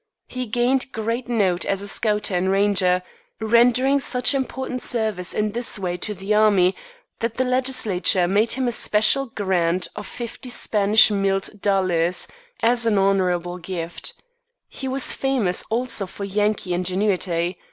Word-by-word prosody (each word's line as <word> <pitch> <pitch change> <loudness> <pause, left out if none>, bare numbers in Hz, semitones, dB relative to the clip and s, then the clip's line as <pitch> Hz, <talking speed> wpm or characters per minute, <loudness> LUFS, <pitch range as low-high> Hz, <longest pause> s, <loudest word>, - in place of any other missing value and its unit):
He 255 -1 -6
gained 250 +4 0
great 230 +2 -4
note 195 -7 +1
as 195 0 -1
a - - -4
scouter 210 -1 0
and 185 +2 0
ranger, 195 -2 +2 0.4
rendering 245 +5 +3
such 250 -1 +2
important 265 -1 -3
service 215 -7 0
in 210 0 -1
this 235 +1 0
way 180 -3 -3
to 210 +3 -3
the 195 +3 -2
army 205 -4 +3 0.4
that 230 0 -3
the 260 - 0
legislature 250 -8 +2
made 205 +5 +2
him 260 0 -1
a - - 0
special 220 +5 +2
grant 185 -5 -1
of 210 - -7
"fifty 240 +1 -8
Spanish 215 -2 +3
milled 195 0 -1
dollars" 180 -3 +1 0.3
as 235 0 +2
an 210 -3 +2
honorable 180 -2 0
gift. 175 -1 -6 0.5
He 265 - -7
was 265 0 +3
famous 250 -10 0
also 230 -4 0
for 200 - -9
Yankee 205 -2 -1
ingenuity. 180 -1 -1
210 Hz, 145 wpm, -22 LUFS, 185-240 Hz, 0.5 s, rendering